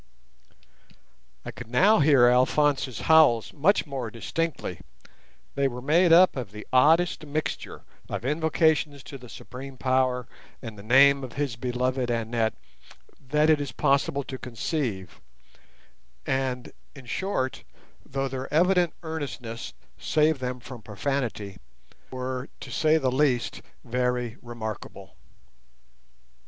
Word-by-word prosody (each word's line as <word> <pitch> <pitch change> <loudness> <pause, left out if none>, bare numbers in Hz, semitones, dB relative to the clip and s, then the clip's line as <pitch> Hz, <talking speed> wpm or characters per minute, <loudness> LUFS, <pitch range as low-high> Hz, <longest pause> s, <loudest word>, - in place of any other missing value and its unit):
I - - -5
could - - -10
now 190 - +4
hear 140 -4 +6
Alphonse's 130 +1 +2
howls 155 -8 +4
much 175 +8 +2
more 135 -6 -4
distinctly; 120 - -3 0.7
they 140 0 +1
were 125 -2 -5
made 165 +7 +3
up 180 +3 +7
of 125 -7 -4
the 105 0 -9
oddest 160 +7 +4
mixture 155 +1 -4 0.3
of - - -4
invocations 155 -1 +1
to 135 - -9
the 125 -1 -13
Supreme 130 +3 -10
Power 130 -1 +1 0.3
and 115 -3 -8
the 100 - -11
name 135 +5 +5
of 125 - -7
his 140 -4 -2
beloved 125 +1 -1
Annette 115 -1 -1 0.6
that 150 +3 +1
it 150 -2 +3
is 145 - -4
possible 140 0 +1
to 130 -1 -7
conceive; 115 - -4 1.0
and, 130 -2 -2 0.2
in 135 -3 -12
short, 130 -2 -2 0.4
though 135 0 -3
their 130 0 -6
evident 180 +1 +3
earnestness 140 -8 -6 0.2
saved 155 -1 +2
them 125 0 -3
from 120 0 -10
profanity, 105 -2 -3 0.5
were, 130 +1 -4
to - - -9
say 155 0 +3
the 130 -5 0
least, 130 -2 +1 0.2
very 125 -1 -1
remarkable. 115 -3 -7
130 Hz, 120 wpm, -26 LUFS, 120-150 Hz, 1.0 s, up